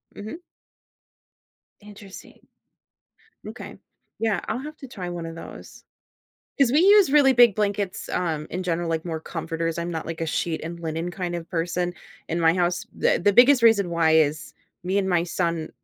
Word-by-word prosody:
Mhm. 215 +9 -7 1.4
Interesting. 205 -1 -13 1.1
M'kay, - - -9 0.4
yeah, 220 -5 0
I'll 230 - -2
have 300 +3 -8
to 270 - -10
try 185 -8 -7
one 175 -1 -5
of 165 0 -7
those. 165 - -11 0.8
'Cause 270 -4 +3
we 295 - +4
use 395 -4 +6
really 280 -3 +6
big 240 -4 +6
blankets, 205 -2 -2
um, 160 -4 -2
in 185 +2 -3
general, 170 -1 -1
like, 165 -1 -2
more 165 -2 -4
comforters, 165 0 -4
I'm 170 +1 -3
not 160 -1 -4
like 165 0 -6
a 165 - -1
sheet 160 +1 -2
and 170 +1 -7
linen 165 +1 -3
kind 175 -2 -4
of 170 -1 -8
person 175 +1 -2 0.3
in 165 +1 -2
my 165 0 +4
house, 180 0 0
the - - +1
the 205 - +4
biggest 250 +3 +6
reason 205 -6 +4
why 165 -2 +2
is 155 -1 +1 0.3
me 190 +3 0
and 190 -1 0
my 175 -2 +2
son 170 -2 -2
175 Hz, 175 wpm, -24 LUFS, 165-210 Hz, 1.4 s, use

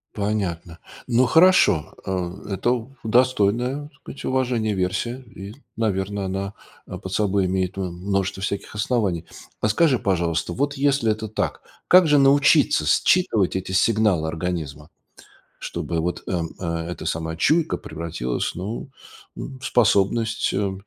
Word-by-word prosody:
Понятно. 95 -5 -3 0.3
Ну 125 +1 +3
хорошо, 160 - +4
э, 95 +2 -4
это 120 +4 0 0.2
достойная, 125 +3 +2
так - - -34
сказать, - - -10
уважения 125 -4 0
версия 95 +6 -1 0.2
и, 100 +2 -8 0.2
наверно, 100 -2 -1
она, 95 +1 -3 0.3
а, - - -6
под 95 - -8
собой 100 -1 +1
имеет, 95 0 -1
м, 95 -3 -3
множество 95 +1 -2
всяких 100 0 -4
оснований. 100 -6 0 0.3
А - - +1
скажи, 130 +3 +3
пожалуйста, 85 -4 0
вот 145 +1 -1
если 135 -5 +2
это 110 +1 -3
так, 110 - -3 0.3
как 180 -2 +7
же 150 -1 +5
научиться 145 +2 +4
считывать 110 - +2
эти 95 0 -5
сигналы 100 -5 +2
организма, 80 -4 -4 0.7
чтобы 85 -1 -3
вот, 85 +2 -3
э, 90 - -1 0.5
эта 90 - -6
самая 80 0 -3
чуйка 160 - +2
превратилась, 80 -6 -4
ну, 105 +9 -5 0.4
м, 135 -2 -7
в - - -11
способность, 110 -1 +2
э, 100 0 0
100 Hz, 135 wpm, -23 LUFS, 90-125 Hz, 0.7 s, как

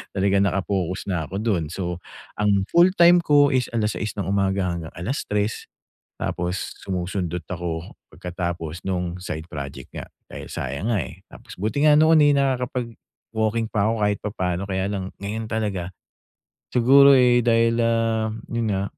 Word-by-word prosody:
Talagang 100 0 +2
naka-focus 95 -1 -2
na 85 -4 -1
ako 95 - -8
do'n. 95 -8 0
So, 90 -1 -4 0.4
ang 100 -2 +2
full-time 175 0 +6
ko 145 -2 +5
is 130 -2 +1
6:00 110 -1 -1
ng - - 0
umaga 95 -1 +1
hanggang 85 -2 -6
3:00 105 +1 -2 0.5
tapos 90 +2 -3
sumusundot 90 -2 -3
ako 85 -2 -4 0.2
pagkatapos 85 -2 -5
nung 90 -2 -2
side 80 -3 -5
project 70 -3 -7
nga, - - -6 0.2
dahil - - -8
sayang 70 - -3
nga, 115 - +2
eh. 65 - -10
Tapos - - -12
buti 110 +10 0
nga 150 - +7
noon, 155 0 +6
eh, 145 - +5
nakakapag-walking 115 -4 -2
pa 100 -1 +1
ako - - 0
kahit 105 0 +1
papaano 90 -3 -2
kaya 95 -1 -1
lang 95 -2 -4
ngayon 110 +3 -4
talaga. 100 -5 -2 0.8
Siguro, 135 +3 +7
eh, 125 -1 +5
dahil, 115 0 +3
ah, 115 -1 +1 0.2
'yun 115 -1 -1
nga, 95 0 0
100 Hz, 150 wpm, -23 LUFS, 90-115 Hz, 0.8 s, nga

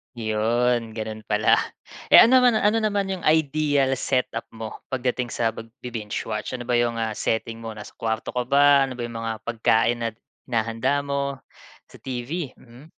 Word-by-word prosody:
'Yon, 115 +1 0
gano'n 110 -1 -6
pala. 105 +1 +3 0.5
Eh, - - +6
ano 255 +3 +6
naman 245 -3 +4
ano 215 +1 +3
naman 200 -3 0
yung 190 - -3
ideal 150 -3 +2
set 130 -2 0
up 115 - -5
mo, 110 -1 -8
pagdating 125 -1 -1
sa 115 -1 -1
pagbi-binge 115 -1 -6
watch? 110 +3 -4
Ano 125 - -6
ba 125 - -4
yung, 120 -1 +1
ah, 115 -1 -1
setting 115 +1 -2
mo, 115 -1 -7
nasa 105 -1 -9
kuwarto 110 0 -2
ka 125 -1 -2
ba? 140 0 +5
Ano 130 - -7
ba 120 - -5
yung 115 -1 -5
mga 115 -1 -4
pagkain 120 0 +2
at 110 - -6 0.3
hinahanda 115 +4 0
mo? 140 -1 -2 0.6
Sa - - -14
TV, 130 +4 -5
mm. 125 +4 -16
120 Hz, 175 wpm, -24 LUFS, 115-140 Hz, 0.6 s, Eh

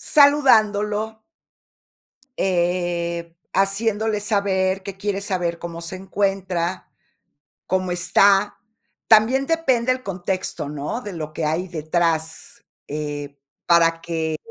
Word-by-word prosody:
Saludándolo 220 -7 +4 1.2
eh, 175 -2 -1 0.2
haciéndole 210 +2 +1
saber 195 -2 0
que 195 0 -7
quieres 200 0 -3
saber 175 -4 -2
cómo 170 -1 -7
se 170 +2 -6
encuentra, 190 -2 -2 0.8
cómo 185 -1 0
está. 195 +3 +3 0.5
También 235 +5 +5
depende 260 -7 +2
el 255 0 -5
contexto, 185 - -3
¿no?, 150 - -4
de 210 -5 -7
lo 155 -3 -6
que 155 - -3
hay 160 +5 -1
detrás, 160 -1 -2 0.2
eh, 145 -1 -5 0.3
para 165 -1 +4
que 160 -1 -2
185 Hz, 105 wpm, -22 LUFS, 170-205 Hz, 1.2 s, También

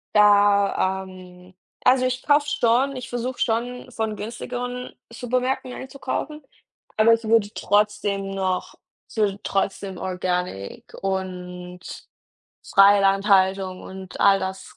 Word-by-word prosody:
da, 200 -2 +4
ähm 185 0 -14 0.3
also, 255 0 +4
ich 255 0 -1
kaufe 290 0 +3
schon 260 +1 +2
ich 250 -1 -7
versuche 245 +1 -4
schon 245 +2 -2
von 220 -2 -3
günstigeren 245 +3 -5 0.2
Supermärkten 250 +2 -2
einzukaufen, 275 +3 -5 0.5
aber 220 +1 +6
ich 230 0 0
würde 220 -2 +3
trotzdem 205 -1 0
noch 190 -1 -2 0.3
ich - - -15
würde 205 -2 +1
trotzdem 195 -1 -2
organic 180 - -4
und 180 -2 -4 0.8
freie 200 +1 +5
Landhaltung 195 -1 +2
und 190 0 -9
all 195 0 +5
das 190 0 -6
205 Hz, 115 wpm, -23 LUFS, 190-245 Hz, 0.8 s, aber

